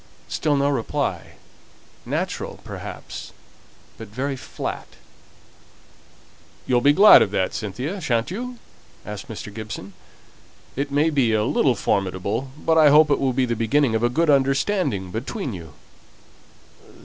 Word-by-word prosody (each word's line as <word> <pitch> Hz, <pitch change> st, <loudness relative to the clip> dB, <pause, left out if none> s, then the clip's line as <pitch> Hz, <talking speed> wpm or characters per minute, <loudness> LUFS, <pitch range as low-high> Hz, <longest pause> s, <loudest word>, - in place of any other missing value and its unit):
Still 150 Hz, -2 st, 0 dB
no 140 Hz, 0 st, +2 dB
reply; 135 Hz, -6 st, -2 dB, 0.7 s
natural, -, -, -3 dB
perhaps, -, -, -8 dB, 0.7 s
but 110 Hz, -, -8 dB
very 135 Hz, +7 st, -3 dB
flat. 130 Hz, -, -6 dB, 1.8 s
"You'll 125 Hz, -1 st, +2 dB
be 145 Hz, -, +5 dB
glad 200 Hz, +8 st, +8 dB
of -, -, +2 dB
that, 95 Hz, -2 st, -1 dB
Cynthia, 130 Hz, -, -4 dB
shan't 120 Hz, -3 st, 0 dB
you?" 245 Hz, +5 st, -5 dB, 0.5 s
asked 105 Hz, -1 st, -7 dB
Mr. 105 Hz, -2 st, -8 dB
Gibson. 105 Hz, -3 st, -7 dB, 0.8 s
"It 140 Hz, +2 st, -2 dB
may 150 Hz, +3 st, +2 dB
be 130 Hz, -6 st, +2 dB
a 105 Hz, 0 st, +2 dB
little 130 Hz, +1 st, +2 dB
formidable, 100 Hz, +6 st, -1 dB
but 160 Hz, +1 st, +2 dB
I 150 Hz, -2 st, +7 dB
hope 150 Hz, +1 st, +6 dB
it -, -, +3 dB
will 135 Hz, -1 st, +1 dB
be 130 Hz, +1 st, +1 dB
the 120 Hz, -1 st, -1 dB
beginning 115 Hz, +3 st, +2 dB
of 110 Hz, -, +1 dB
a 120 Hz, -, +2 dB
good 160 Hz, +5 st, +2 dB
understanding 135 Hz, -, +1 dB
between 130 Hz, -, -4 dB
you." 80 Hz, -4 st, -9 dB
130 Hz, 135 wpm, -23 LUFS, 110-145 Hz, 1.8 s, glad